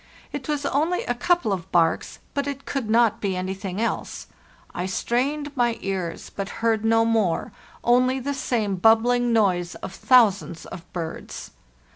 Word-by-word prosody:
It -, -, -5 dB
was 295 Hz, -1 st, -1 dB
only 315 Hz, +6 st, +1 dB
a 245 Hz, -, -1 dB
couple 245 Hz, -, +1 dB
of 185 Hz, 0 st, -5 dB
barks, 165 Hz, -2 st, +1 dB, 0.2 s
but 280 Hz, 0 st, -1 dB
it 275 Hz, -1 st, -5 dB
could 265 Hz, -6 st, -3 dB
not 230 Hz, -1 st, +3 dB
be 195 Hz, -2 st, -1 dB
anything 190 Hz, +1 st, -4 dB
else. 230 Hz, -, -2 dB, 0.5 s
I 180 Hz, +1 st, -3 dB
strained 280 Hz, +9 st, -1 dB
my 240 Hz, -3 st, +1 dB
ears, 185 Hz, -4 st, -4 dB
but 195 Hz, 0 st, -3 dB, 0.2 s
heard 220 Hz, -1 st, +2 dB
no 225 Hz, 0 st, +4 dB
more, 220 Hz, -7 st, +1 dB, 0.3 s
only 255 Hz, +2 st, +3 dB
the 280 Hz, +3 st, -2 dB
same 220 Hz, -7 st, -1 dB
bubbling 235 Hz, +4 st, +4 dB
noise 185 Hz, -6 st, +2 dB
of 190 Hz, -, -7 dB
thousands 195 Hz, -, +3 dB
of 180 Hz, 0 st, -10 dB
birds. 165 Hz, -2 st, -6 dB
225 Hz, 155 wpm, -24 LUFS, 190-255 Hz, 0.5 s, no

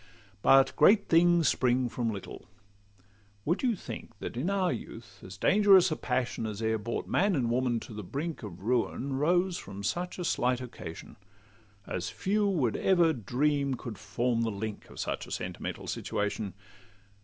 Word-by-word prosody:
But 135 Hz, +4 st, +5 dB
great 200 Hz, +7 st, +5 dB
things 170 Hz, -1 st, +5 dB
spring 125 Hz, 0 st, +2 dB
from 120 Hz, -1 st, -2 dB
little:—Would 100 Hz, -, -8 dB
you 245 Hz, -4 st, +2 dB
think, -, -, -9 dB
That -, -, -6 dB
in 135 Hz, +10 st, -1 dB
our 190 Hz, -3 st, +1 dB
youth, 105 Hz, -4 st, -9 dB
as 95 Hz, 0 st, -9 dB
dangerous 190 Hz, -, +5 dB
a -, -, +1 dB
passion 120 Hz, -5 st, -2 dB
As 105 Hz, -1 st, -5 dB
e'er 110 Hz, 0 st, 0 dB
brought 115 Hz, +3 st, -3 dB
man 195 Hz, 0 st, +2 dB
and 120 Hz, -5 st, 0 dB
woman 120 Hz, -1 st, +1 dB
to -, -, -9 dB
the 105 Hz, -, -5 dB
brink 145 Hz, -, -4 dB
Of 95 Hz, -4 st, -9 dB
ruin, 125 Hz, +3 st, 0 dB
rose 175 Hz, +4 st, +2 dB
from 100 Hz, +1 st, -8 dB
such 180 Hz, -, -2 dB
a 180 Hz, -, -3 dB
slight 125 Hz, -3 st, +1 dB
occasion, 95 Hz, -10 st, -9 dB, 0.7 s
As 90 Hz, 0 st, -3 dB
few 205 Hz, +2 st, 0 dB
would 145 Hz, -, +1 dB
ever 175 Hz, -4 st, +4 dB
dream 140 Hz, +3 st, 0 dB
could 115 Hz, -5 st, -8 dB
form 115 Hz, +3 st, -1 dB
the 115 Hz, -, +1 dB
link 105 Hz, 0 st, -5 dB
Of -, -, -12 dB
such -, -, -3 dB
a -, -, -12 dB
sentimental -, -, -5 dB
situation? 105 Hz, -2 st, -3 dB
125 Hz, 165 wpm, -29 LUFS, 105-170 Hz, 0.7 s, But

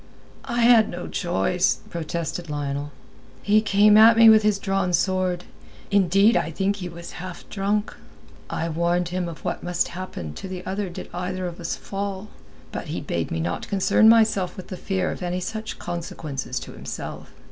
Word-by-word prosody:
"I 240 Hz, 0 st, -1 dB
had 230 Hz, -2 st, +6 dB
no 175 Hz, 0 st, -6 dB
choice," 180 Hz, 0 st, 0 dB
protested 170 Hz, 0 st, -4 dB
Lionel. 145 Hz, 0 st, -3 dB, 0.5 s
"He 210 Hz, +1 st, +4 dB
came 210 Hz, 0 st, +5 dB
at 225 Hz, +1 st, +8 dB
me 225 Hz, 0 st, +9 dB
with 220 Hz, -1 st, +7 dB
his 210 Hz, -1 st, +2 dB
drawn 195 Hz, -2 st, -1 dB
sword. 185 Hz, -1 st, +1 dB, 0.5 s
Indeed, 200 Hz, +3 st, +4 dB
I -, -, +1 dB
think 195 Hz, +5 st, -1 dB
he 180 Hz, -2 st, -5 dB
was 170 Hz, 0 st, -9 dB
half 185 Hz, -1 st, -8 dB
drunk. 205 Hz, +2 st, -1 dB, 0.5 s
I 165 Hz, -, -2 dB
warned 170 Hz, +2 st, 0 dB
him 180 Hz, -1 st, -2 dB
of 165 Hz, -, -10 dB
what -, -, -2 dB
must 175 Hz, 0 st, -1 dB
happen 170 Hz, -, -6 dB
to 190 Hz, -, -7 dB
the 185 Hz, -1 st, -7 dB
other 195 Hz, 0 st, -2 dB
did 175 Hz, -, -8 dB
either 180 Hz, +1 st, -3 dB
of 175 Hz, -1 st, -6 dB
us -, -, -3 dB
fall, 200 Hz, +1 st, -5 dB, 0.4 s
but -, -, -5 dB
he -, -, -3 dB
bade 85 Hz, -1 st, -3 dB
me 80 Hz, -, -2 dB
not 85 Hz, +2 st, -3 dB
concern 200 Hz, +2 st, +4 dB
myself 220 Hz, -5 st, +3 dB
with 185 Hz, -, -9 dB
the 185 Hz, -, -5 dB
fear 185 Hz, 0 st, -1 dB
of -, -, -7 dB
any 180 Hz, 0 st, -2 dB
such 220 Hz, +4 st, -5 dB
consequences 155 Hz, -7 st, -5 dB
to -, -, -9 dB
himself. 65 Hz, +5 st, -7 dB
185 Hz, 180 wpm, -24 LUFS, 170-200 Hz, 0.5 s, me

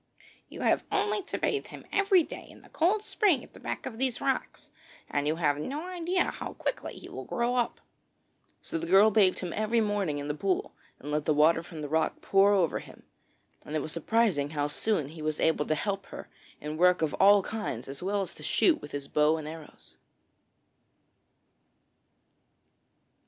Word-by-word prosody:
'You -, -, -8 dB
have -, -, +2 dB
only 420 Hz, 0 st, +1 dB
to -, -, -4 dB
bathe 420 Hz, -, -1 dB
him -, -, -11 dB
every 390 Hz, -3 st, +4 dB
day -, -, -9 dB
in -, -, -16 dB
the -, -, -18 dB
cold 395 Hz, +6 st, +1 dB
spring 390 Hz, -, +2 dB
at -, -, -16 dB
the -, -, -13 dB
back -, -, -5 dB
of 230 Hz, -3 st, -6 dB
these 260 Hz, -3 st, +1 dB
rocks, 270 Hz, -1 st, -2 dB, 0.4 s
and 145 Hz, 0 st, 0 dB
you 155 Hz, -, +1 dB
have 150 Hz, -3 st, +1 dB
no 285 Hz, -, -4 dB
idea 360 Hz, 0 st, 0 dB
how -, -, -5 dB
quickly -, -, -4 dB
he -, -, -10 dB
will -, -, -7 dB
grow 240 Hz, 0 st, -1 dB
up.' 245 Hz, -2 st, 0 dB, 0.8 s
So 165 Hz, -, -3 dB
the 165 Hz, -, -5 dB
girl 195 Hz, +5 st, +6 dB
bathed 195 Hz, -3 st, +4 dB
him 180 Hz, -2 st, -4 dB
every 215 Hz, +2 st, +1 dB
morning 205 Hz, -8 st, 0 dB
in 145 Hz, 0 st, -4 dB
the 150 Hz, -, -1 dB
pool 185 Hz, +4 st, -1 dB, 0.2 s
and 145 Hz, -, -7 dB
let 150 Hz, 0 st, -1 dB
the 155 Hz, -, +2 dB
water 160 Hz, +2 st, +4 dB
from 165 Hz, -2 st, -9 dB
the -, -, -3 dB
rock 160 Hz, +2 st, 0 dB
pour 195 Hz, +1 st, +4 dB
over 185 Hz, -5 st, +2 dB
him, -, -, -14 dB, 0.6 s
and 150 Hz, -, -6 dB
it 155 Hz, -, 0 dB
was 155 Hz, -, -5 dB
surprising 170 Hz, -4 st, +1 dB
how 145 Hz, -1 st, -1 dB
soon 150 Hz, +1 st, 0 dB
he 160 Hz, +1 st, -10 dB
was 155 Hz, 0 st, -2 dB
able 160 Hz, -2 st, +2 dB
to 155 Hz, -, +1 dB
help 195 Hz, +3 st, -3 dB
her -, -, -9 dB, 0.3 s
in 150 Hz, +1 st, -5 dB
work 180 Hz, 0 st, +4 dB
of 155 Hz, -, 0 dB
all 200 Hz, 0 st, +7 dB
kinds 210 Hz, -, -4 dB
as 135 Hz, +3 st, -7 dB
well 200 Hz, +2 st, 0 dB
as 190 Hz, -, -5 dB
to -, -, -14 dB
shoot 330 Hz, -4 st, +2 dB
with -, -, -9 dB
his 140 Hz, -1 st, -4 dB
bow 150 Hz, +2 st, +3 dB
and 155 Hz, -1 st, -6 dB
arrows. 160 Hz, -1 st, -10 dB
185 Hz, 195 wpm, -29 LUFS, 155-235 Hz, 0.8 s, all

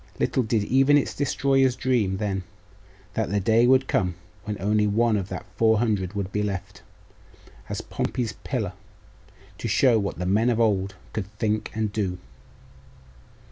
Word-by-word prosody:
Little 130 Hz, -, +1 dB
did 110 Hz, -2 st, 0 dB
even 135 Hz, +6 st, +4 dB
its 145 Hz, -, 0 dB
destroyers 135 Hz, -2 st, +2 dB
dream 115 Hz, -9 st, +1 dB
then, 100 Hz, -2 st, -2 dB, 0.7 s
that -, -, -1 dB
the 100 Hz, +1 st, +1 dB
day 115 Hz, +4 st, +4 dB
would 130 Hz, +1 st, +4 dB
come 90 Hz, -3 st, 0 dB, 0.3 s
when 105 Hz, -2 st, -3 dB
one 100 Hz, -, -7 dB, 0.5 s
only 105 Hz, -, +2 dB
of 95 Hz, 0 st, -5 dB
that -, -, -6 dB
four 110 Hz, -1 st, +4 dB
hundred 105 Hz, -5 st, 0 dB
would 100 Hz, -2 st, -3 dB
be 105 Hz, -, -1 dB
left, 100 Hz, -1 st, -4 dB, 0.9 s
as -, -, -3 dB
'Pompey's 120 Hz, -4 st, -3 dB
Pillar,' 110 Hz, -9 st, -2 dB, 0.9 s
to -, -, -3 dB
show 125 Hz, -5 st, +4 dB
what 100 Hz, -1 st, -3 dB
the 90 Hz, -, -3 dB
men 105 Hz, +6 st, +2 dB
of 120 Hz, -2 st, +1 dB
old 100 Hz, -3 st, +1 dB, 0.2 s
could 100 Hz, -3 st, -3 dB
think 110 Hz, 0 st, -1 dB
and 110 Hz, -2 st, -1 dB
do. 95 Hz, -4 st, -1 dB
105 Hz, 160 wpm, -25 LUFS, 100-120 Hz, 0.9 s, even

